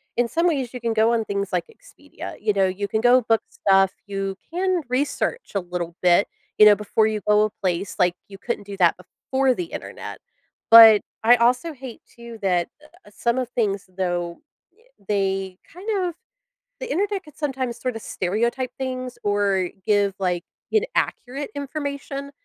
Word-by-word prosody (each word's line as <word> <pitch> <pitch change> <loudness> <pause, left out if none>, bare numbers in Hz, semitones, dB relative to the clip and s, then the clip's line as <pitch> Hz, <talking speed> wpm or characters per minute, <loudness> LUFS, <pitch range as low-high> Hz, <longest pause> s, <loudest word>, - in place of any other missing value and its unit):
in 240 0 +2
some 335 +8 0
ways, 270 -7 -1
you - - -4
can 230 -1 0
go 225 +1 +3
on 225 -1 -1
things 200 -1 -3
like - - 0
Expedia, 460 +2 -11
you 210 - +1
know, 195 -1 +3
you 195 +2 -3
can 220 +2 -1
go 245 +2 +5
book 225 -1 +2
stuff, 195 -1 +3 0.2
you 195 -1 -3 0.2
can 365 0 +1
research 285 - -1
a - - +3
little 175 -2 -5
bit, 180 +2 +5 0.3
you 210 - +9
know, 210 - +8
before 210 +1 +1
you 215 -1 -1
go 210 0 +5
a - - -2
place, 185 +1 -1
like, 180 -1 +3
you 195 - -11
couldn't 205 0 -4
do 200 -1 -7
that 175 -3 +4
before 265 +8 -1
the 360 - -2
Internet; - - -8 0.5
but 225 -2 +10 0.2
I 235 +2 +7
also 250 +7 +2
hate 260 -4 -10
too 235 -1 -10
that, 180 -3 +1 0.4
uh, - - -13
some 235 +1 0
of 250 -2 -3
things, 200 -6 -1
though, 175 -2 -2 0.3
y 435 +6 -30 0.2
they 195 -2 -1 0.2
kind 375 +6 -8 0.2
of 350 - -4 0.7
the - - -6
internet 400 0 -1
could 300 -2 -16
sometimes 265 -5 -3
sort 255 -2 -3
of - - -6
stereotype 235 +7 -1
things 255 -1 -4
or 200 -3 +1 0.2
give, 205 -2 +2
like, 180 -2 -1 0.3
inaccurate 290 - -1
information. 280 -1 -5
225 Hz, 175 wpm, -23 LUFS, 195-265 Hz, 0.7 s, but